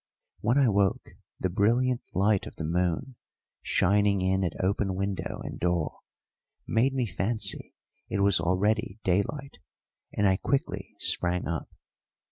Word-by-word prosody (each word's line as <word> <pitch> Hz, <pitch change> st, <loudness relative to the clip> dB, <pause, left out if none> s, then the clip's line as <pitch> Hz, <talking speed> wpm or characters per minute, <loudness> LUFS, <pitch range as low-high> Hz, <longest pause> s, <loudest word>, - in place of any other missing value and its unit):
When 120 Hz, +5 st, +2 dB
I 140 Hz, -3 st, +5 dB
woke, 100 Hz, -3 st, +1 dB, 0.3 s
the 95 Hz, -, -1 dB
brilliant 120 Hz, +6 st, +2 dB
light 100 Hz, +1 st, +2 dB
of -, -, -10 dB
the -, -, -5 dB
moon, 90 Hz, +9 st, -1 dB, 0.4 s
shining 100 Hz, +1 st, +2 dB
in 95 Hz, +1 st, +1 dB
at 85 Hz, -3 st, -3 dB
open 95 Hz, 0 st, 0 dB
window 100 Hz, 0 st, -3 dB
and -, -, -7 dB
door, 85 Hz, -3 st, -1 dB, 0.7 s
made 130 Hz, +4 st, +1 dB
me 130 Hz, -2 st, +1 dB
fancy 105 Hz, +3 st, -1 dB, 0.3 s
it 100 Hz, -, 0 dB
was 100 Hz, -2 st, +4 dB
already 105 Hz, +5 st, +1 dB
daylight, 135 Hz, +10 st, -1 dB, 0.5 s
and 105 Hz, -, +2 dB
I 95 Hz, -1 st, +3 dB
quickly 140 Hz, +6 st, -2 dB
sprang 90 Hz, 0 st, +1 dB
up. 85 Hz, -2 st, -3 dB
100 Hz, 135 wpm, -28 LUFS, 90-115 Hz, 0.7 s, I